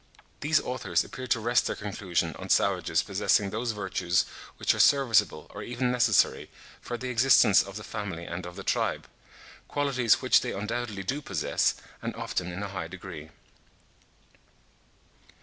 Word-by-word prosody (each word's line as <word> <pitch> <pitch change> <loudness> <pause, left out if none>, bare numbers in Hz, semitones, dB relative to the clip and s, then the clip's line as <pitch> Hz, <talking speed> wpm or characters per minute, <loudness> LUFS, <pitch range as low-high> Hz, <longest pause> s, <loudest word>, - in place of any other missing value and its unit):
These 155 +1 +3
authors 125 +1 -1
appear 130 0 -8
to 120 -1 +2
rest 120 +2 +2
their - - -2
conclusion 90 -5 -2
on - - -8
savages - - +2
possessing 100 -1 +1
those 115 +3 -2
virtues 95 -4 0 0.3
which - - +2
are - - -5
serviceable, 115 - +4
or - - -7
even 125 +1 -1
necessary, 120 -4 +2 0.3
for 120 - -5
the 130 +2 -5
existence 120 -4 +6
of 100 -1 -8
the 105 - -6
family 100 -7 -5
and 90 +1 -5
of 90 - -10
the 95 - -7
tribe,—qualities 130 0 -1
which - - +4
they - - -3
undoubtedly 105 0 -3
do 135 +10 -2
possess, 95 - 0 0.3
and - - -4
often 90 0 -3
in 90 +3 -5
a 100 - -4
high 95 -4 -5
degree. 85 -4 -9
105 Hz, 150 wpm, -28 LUFS, 95-125 Hz, 0.3 s, existence